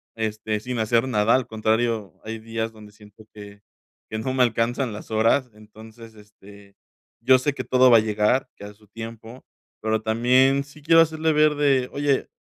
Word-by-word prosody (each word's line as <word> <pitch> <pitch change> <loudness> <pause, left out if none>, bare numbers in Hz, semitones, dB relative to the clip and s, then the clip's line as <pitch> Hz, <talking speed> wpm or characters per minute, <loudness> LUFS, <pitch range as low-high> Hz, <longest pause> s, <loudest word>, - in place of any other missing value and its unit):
este, 110 -1 -3
sin 125 +3 -5
hacer 115 +3 +1
nada, 105 -2 +2
al 130 -2 +1
contrario, 110 -3 -1
hay 110 +1 -5
días 115 0 -4
donde 105 -1 -15
siento 105 +1 -18
que 100 -1 -13 0.5
que 110 - -4
no 130 +3 -3
me 130 -1 +3
alcanzan 120 +2 -1
las 105 - -10
horas. 115 +4 +1
Entonces, 110 +2 -15
este, 100 -1 -18 0.5
yo 130 0 +5
sé 145 +3 -1
que - - -6
todo 130 0 +4
va 115 - +7
a - - +5
llegar, 110 +4 0
que 100 - -10
a 105 - -10
su 105 0 -25
tiempo, 115 +2 -10 0.4
pero 110 0 -1
también 125 +5 +2
sí 145 +1 -17
quiero 165 +2 +4
hacerle 160 0 0
ver 150 0 +3
de: 135 -3 +1
"Oye, 140 -1 0
115 Hz, 185 wpm, -23 LUFS, 110-130 Hz, 0.5 s, va